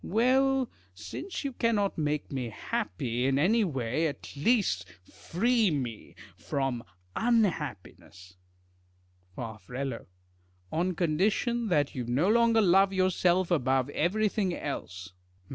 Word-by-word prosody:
Well, 260 +4 +2 0.3
since 360 - -6
you 275 -2 -3
cannot 220 -5 +1
make 150 -1 -2
me 130 -4 -3
happy 120 +4 -2
in 135 0 +2
any 215 +10 +3
way, 135 - -1
at 145 -1 -7
least 200 - +1
free 200 - 0
me 125 -8 -4 0.2
from 120 +8 -2 0.3
unhappiness. 150 - -1 1.0
Far. 110 -2 -6 1.1
On 180 +2 0
condition 205 +8 +1
that 150 -7 +1
you 125 - -3
no 140 +10 +2
longer 230 0 +4
love 195 0 +5
yourself 185 -1 +2
above 135 -3 +1
everything 195 +2 0
else. 95 - -6
3fal. 90 0 -33
165 Hz, 110 wpm, -29 LUFS, -, 1.1 s, love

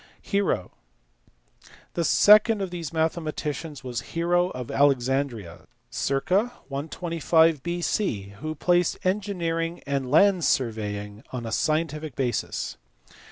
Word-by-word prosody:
Hero*. 200 - 0 1.2
The 170 - -1
second 215 +5 +6
of 190 -2 -3
these 170 -4 -5
mathematicians 155 -2 -2
was 120 -3 -4 0.2
Hero 175 +1 +2
of 125 -6 -6
Alexandria 130 -8 0 0.2
(circ. 135 +4 -2
125 165 - +1
B.C.) 170 - -2
who 155 +1 -4
placed 175 +3 +2
engineering 175 -4 -1
and 140 -2 -2
land 185 +4 +4
surveying 105 -5 -1
on 125 -2 -5
a 115 - -5
scientific 155 +1 -1
basis. 125 -3 -2
155 Hz, 105 wpm, -25 LUFS, 130-175 Hz, 1.2 s, second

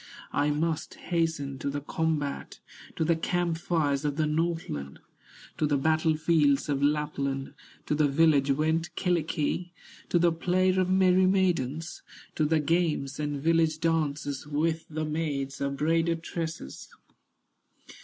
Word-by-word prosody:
I 145 +1 +2
must 155 +1 -1
hasten 160 -6 -2
to 140 - -2
the 145 +1 -2
combat, 150 -1 -2 0.4
To 160 - 0
the 170 +1 +3
camp 170 0 -1
fires 150 -5 0
of 145 -1 -1
the 155 0 +1
Northland, 150 - -2 0.6
To 155 - +2
the 145 -1 +2
battle 155 +2 +2
fields 150 -4 +2
of 140 -1 0
Lapland; 140 -2 -1 0.3
To - - -1
the 150 0 +3
village 145 -1 +3
went 160 +4 0
Kyllikki, 175 0 -1 0.4
To - - +3
the 170 0 +4
play 180 +3 +1
of 185 0 +1
merry 185 0 +4
maidens, 170 -5 0 0.3
To 155 - +1
the 155 +1 +2
games 150 -3 0
and 145 -1 -2
village 165 -1 +2
dances, 150 -4 -1
With 160 +2 -1
the 155 0 -3
maids 145 -3 -3
of 140 0 -1
braided 165 +2 +1
tresses." 160 - -6
155 Hz, 140 wpm, -28 LUFS, 145-165 Hz, 0.6 s, the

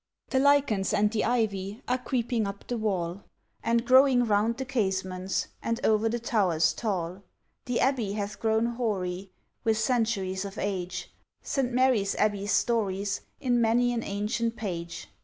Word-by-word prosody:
The 265 - +3
lichens 270 -8 +3
and 210 0 +3
the 220 -2 0
ivy 210 -1 -1
Are 250 +1 +1
creeping 240 -4 -1
up 200 0 -7
the 245 - -3
wall, 190 -3 -2 0.4
And 230 +1 +1
growing 260 -1 +6
round 220 +2 +2
the 265 - -3
casements, 190 -6 -1
And 230 0 -1
o'er 220 +1 +3
the 235 - -1
towers 190 -9 +2
tall. 185 -4 -3 0.4
The 245 -1 -1
Abbey 245 -7 +1
hath 205 0 -4
grown 220 0 +2
hoary, 200 -6 -2 0.3
With 225 -2 +2
centuries 215 -5 0
of 200 +1 -7
age, 185 -2 -3 0.3
St. 265 -3 -1
Mary's 245 -5 +2
Abbey 205 -1 0
stories 205 -3 0 0.2
In 245 -2 +2
many 240 +2 +3
an 235 - -1
ancient 225 +3 -2
page. 170 -6 -5
220 Hz, 150 wpm, -28 LUFS, 195-240 Hz, 0.4 s, growing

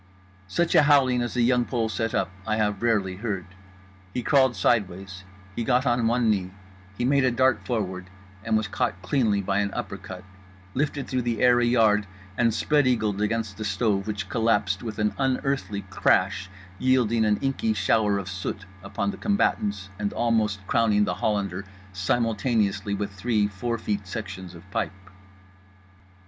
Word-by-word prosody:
Such 170 - 0
a 160 - +7
howling 135 -4 +4
as 120 +1 -3
The 120 - +2
Young 125 0 +3
Pole 120 -2 -1
set 115 +1 -2
up 95 -1 0 0.2
I 110 - +1
have 105 -2 0
rarely 100 -6 +1
heard: 100 -4 -3 0.7
he 125 - -1
crawled 130 -2 +3
sideways; 95 -2 0 0.3
he 115 - -2
got 125 +2 +2
on 120 -2 +2
one 120 0 +2
knee; 95 -4 +1 0.5
he 120 - 0
made 140 +1 +3
a 130 - +4
dart 130 -2 +2
forward—and 95 -2 -3
was 110 -1 -1
caught 95 -1 -2
cleanly 105 -1 +1
by 100 +1 0
an 100 0 0
uppercut, 95 -4 -6 0.5
lifted 145 0 -1
through 130 -1 -1
the 120 -2 -2
air 125 -1 +5
a 120 - +2
yard, 110 -4 +3 0.3
and 115 +1 +3
spread 145 +4 +2
eagled 110 -5 +1
against 105 -1 -1
the 110 - -4
stove 100 0 0
which 100 -3 -3
collapsed 105 -4 +1
with 110 -3 -6
an 105 0 +1
unearthly 135 -6 -1
crash 95 0 +2 0.3
yielding 120 -3 +2
an 105 -1 +2
inky 140 +12 0
shower 105 -2 +2
of 100 -2 -5
soot 95 +1 -5 0.2
upon 100 +1 -2
the - - -9
combatants 100 - 0
and 105 -1 -2
almost 110 -4 0
crowning 105 -1 +3
The - - -1
Hollander 100 -1 -1 0.3
simultaneously 105 +1 0
with 100 0 -3
three 105 +1 +1
four 115 +4 -3
feet 105 -3 -3
sections 95 -3 -6
of 85 - -12
pipe. 95 -1 -4
105 Hz, 165 wpm, -25 LUFS, 100-120 Hz, 0.7 s, a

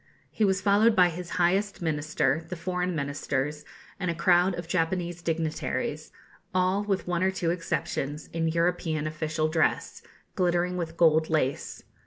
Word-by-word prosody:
He 220 - -1
was 190 -1 +2
followed 210 +3 +4
by 180 -1 +6
his 175 +1 -7
highest 190 +4 +1
Minister, 155 -1 0
the 180 - -4
foreign 180 +1 -2
Ministers, 145 0 -2 0.4
and 180 -2 -1
a 170 - -1
crowd 175 +2 +3
of 170 -1 -6
Japanese 175 0 -1
dignitaries, 160 -2 -2 0.4
all, 185 +2 +2
with 195 -3 -1
one 175 -1 0
or 190 - +3
two 180 -3 -1
exceptions, 155 -3 -3
in 165 0 0
European 165 -2 0
official 155 0 -1
dress, 155 0 0 0.3
glittering 180 -1 +1
with 165 -2 -4
gold 160 -1 +4
lace. 145 -4 -1
170 Hz, 150 wpm, -27 LUFS, 155-180 Hz, 0.4 s, by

